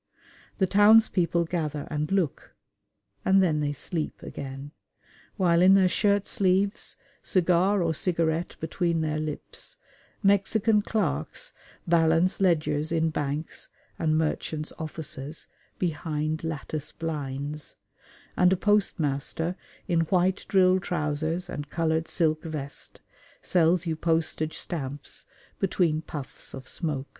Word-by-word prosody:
The 190 - +3
townspeople 205 -4 +5
gather 155 -4 -3
and 150 +2 -2
look, 185 -7 -1 0.7
and 195 +1 +5
then 155 -4 +2
they 145 -1 0
sleep 155 +3 -4
again; 135 +1 -7 0.7
while 175 -3 +3
in 190 +2 +7
their 190 -1 +5
shirt 200 +2 +2
sleeves, 195 +1 0 0.2
cigar 185 +2 +2
or 165 -1 +1
cigarette 165 0 0
between 165 +1 0
their 155 -1 -1
lips, 155 - -6 0.5
Mexican 205 +2 +3
clerks 225 - -2 0.3
balance 165 +3 +3
ledgers 155 -4 +2
in 165 -1 +1
banks 150 +1 -3 0.3
and 155 -1 +2
merchants' 155 0 -2
offices 155 -2 -6 0.3
behind 155 -2 -2
lattice 155 -1 -4
blinds, 150 -2 -4 0.6
and 180 0 +4
a 190 - +3
postmaster 170 -5 0 0.3
in 170 -3 +2
white 185 +2 +1
drill 185 -1 +4
trousers 160 +1 -2
and 145 -4 -6
coloured 160 0 0
silk 155 -2 +1
vest 150 -4 -6 0.4
sells 175 0 +3
you 165 -1 -1
postage 160 -1 0
stamps 145 -4 -6 0.3
between 175 -5 +1
puffs 145 -5 -7
of 130 -1 -9
smoke. 145 -5 -2
165 Hz, 115 wpm, -27 LUFS, 155-185 Hz, 0.7 s, in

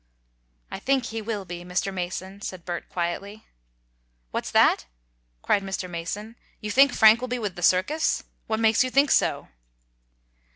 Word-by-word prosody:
"I - - -5
think 270 -2 +1
he 225 -1 -4
will 210 -2 -4
be, 175 -1 -7
Mr. 180 +2 -2
Mason," 185 +2 -5
said 185 -4 -7
Bert, 175 -1 -5
quietly. 195 +5 -4 0.9
"What's - - -3
that?" - - +4 0.6
cried 200 - +2
Mr. 190 -1 -4
Mason. 200 +7 -6 0.2
"You 210 - -4
think 275 +5 +6
Frank 220 +1 +6
will 255 - -3
be 250 0 -2
with 205 -6 -4
the 175 - -8
circus? 185 - +2 0.2
What 220 0 -1
makes 225 +1 +4
you 255 - -2
think 275 +2 +3
so?" - - +1
205 Hz, 160 wpm, -25 LUFS, 180-230 Hz, 0.9 s, think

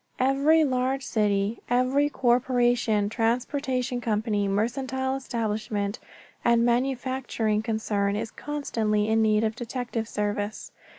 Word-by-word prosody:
Every 280 +5 +4
large 260 -1 0
city, 205 0 0
every 255 +4 +2
corporation, 240 -4 +2
transportation 250 +3 -1
company, 210 -2 0
mercantile 260 +6 -1
establishment 215 -4 -2 0.4
and 235 0 +4
manufacturing 245 -3 0
concern 215 -3 -1
is 220 +1 -3
constantly 220 -8 -1
in 220 0 +3
need 215 0 +3
of 220 0 0
detective 240 -2 -4
service. 205 0 -3
235 Hz, 105 wpm, -26 LUFS, 215-260 Hz, 0.4 s, Every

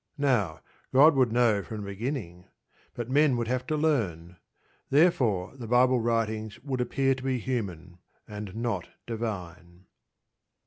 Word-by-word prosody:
Now, 120 - +1 0.3
God 145 +5 +7
would 130 -4 +2
know 115 -3 +3
from 105 +3 -7
the - - -6
beginning; 100 - -5 0.5
but 120 -2 -4
men 140 0 +3
would 120 -1 -2
have 125 +1 -2
to 155 - 0
learn. 95 - -1 0.5
Therefore 130 - +2
the 120 -4 -8
Bible 125 +2 +4
writings 110 -2 -1
would 130 -3 -2
appear 135 +2 +1
to 130 - -7
be 130 -1 0
human, 95 -8 -4 0.3
and 105 -3 -7
not 115 -7 -2 0.2
divine. 90 -6 -6
115 Hz, 140 wpm, -28 LUFS, 100-130 Hz, 0.5 s, God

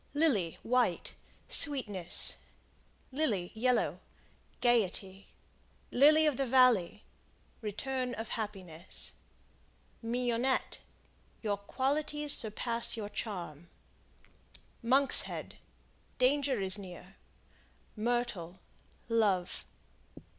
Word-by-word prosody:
Lily, 235 - +1
White 240 -7 0 0.3
Sweetness. 210 - +3 0.7
Lily, 235 - -1
Yellow 245 +3 0 0.6
Gaiety. 200 -5 -1 0.6
Lily 305 +4 +5
of 295 -5 +1
the 275 - -1
Valley 230 -6 +3 0.6
Return 250 +4 -4
of 225 0 -7
happiness. 190 -6 -4 0.9
Mignonette 245 +2 -1 0.6
Your 205 -2 0
qualities 290 +7 0
surpass 230 +2 -1
your 210 -2 -5
charm. 175 -8 -7 1.1
Monkshead 265 +4 +4 0.6
Danger 265 -1 +1
is 190 +1 +3
near. 185 0 -12 0.8
Myrtle 215 -6 -3 0.5
Love. 205 -6 0
230 Hz, 75 wpm, -31 LUFS, 195-260 Hz, 1.1 s, Lily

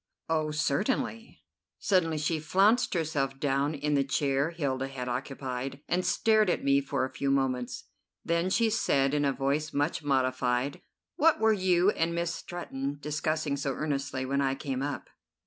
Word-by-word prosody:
"Oh, 155 -1 0
certainly." 215 - -1 0.3
Suddenly 165 -5 +1
she 155 +2 0
flounced 195 +9 +3
herself 145 -5 -1
down 140 +2 0
in 150 +1 -1
the 140 -1 +3
chair 140 +1 +1
Hilda 135 -6 -2
had 130 -2 -6
occupied, 130 +1 -4
and 180 +1 +1
stared 215 -1 +3
at - - 0
me 140 0 +4
for 135 -1 -1
a 130 - -8
few 140 - -1
moments. 130 -2 0 0.4
Then 170 +2 +1
she 225 +3 +2
said 140 -10 +2
in 145 -1 +2
a 140 - +3
voice 140 +3 -1
much 145 +4 0
modified: 130 -1 0 0.4
"What 320 +1 +4
were 220 0 +4
you 185 -1 +3
and 165 -2 -1
Miss 170 0 -1
Stretton 145 -6 -5
discussing 150 0 -1
so 140 -1 -2
earnestly 135 -2 -2
when 140 +1 0
I 135 -1 +1
came 135 -2 -3
up?" 145 +1 -4
145 Hz, 165 wpm, -29 LUFS, 135-170 Hz, 0.4 s, me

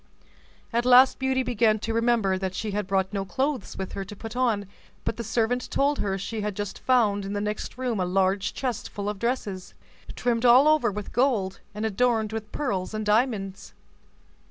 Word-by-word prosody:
At 235 +1 +2
last 255 +1 +6
Beauty 265 0 +1
began 225 -3 +2
to 225 +1 -3
remember 230 -4 +2
that 190 0 -3
she 215 +1 -3
had 205 -1 -2
brought 190 0 0
no 195 -1 -1
clothes 260 +6 -2
with 190 -1 -4
her 195 - -4
to 205 - -9
put 225 +3 -8
on; 230 -5 +1 0.4
but - - -1
the 235 - -4
servant 230 +2 0
told 285 +1 +1
her 195 -1 -1
she 215 +3 -4
had 210 -1 -3
just 205 -1 -5
found 215 -6 +2
in 195 +1 -4
the 205 - -1
next 210 +3 -4
room 250 -5 -1
a 185 - +1
large 190 +2 +1
chest 250 -5 -3
full 205 0 -5
of 210 -1 -3
dresses, 205 -6 -3 0.4
trimmed 235 -1 0
all 250 +4 +7
over 305 -6 +4
with 205 0 -6
gold, 220 -7 +1 0.2
and 210 +1 -2
adorned 220 0 +1
within 220 -1 -5
pearls 205 -8 -2
and 215 0 -3
diamonds. 210 -3 0
215 Hz, 195 wpm, -26 LUFS, 195-245 Hz, 0.4 s, all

